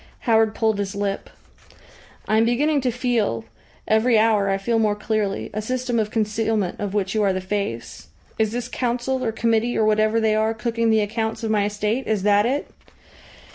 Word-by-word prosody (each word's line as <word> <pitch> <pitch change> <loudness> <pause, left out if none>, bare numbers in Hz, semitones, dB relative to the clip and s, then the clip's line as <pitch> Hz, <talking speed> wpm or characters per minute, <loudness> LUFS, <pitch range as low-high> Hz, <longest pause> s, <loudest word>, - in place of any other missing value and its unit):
Howard 225 -2 +2
pulled 220 -2 +1
his 200 0 -3
lip. 200 -1 -3 1.0
"I 215 - +2
am 225 - +4
beginning 285 +5 +2
to 255 - 0
feel 230 - -1 0.4
every 220 +2 +3
hour 215 -2 +3
I 195 - +1
feel 225 +4 0
more 210 -2 +2
clearly 210 -1 -2
a 215 - -2
system 250 +1 -1
of 215 -1 0
concealment 215 -3 -1
of 205 0 -3
which 195 -2 0
you 215 - +1
are 200 -2 +3
the 185 - -2
face. 185 - -4 0.3
Is 220 -1 +2
this 240 +1 -3
Council, 250 +1 -2
or 225 - 0
committee, 230 +1 0
or 220 - +3
whatever 215 +1 +2
they 220 -1 +2
are, 220 +1 +1
cooking 230 0 -1
the 220 -1 +4
accounts 220 +2 -2
of 220 - -1
my 205 -2 +2
estate? 210 +5 -2
Is 215 -3 0
that 205 +1 +4
it?" 280 +4 -1
220 Hz, 190 wpm, -22 LUFS, 205-230 Hz, 1.0 s, am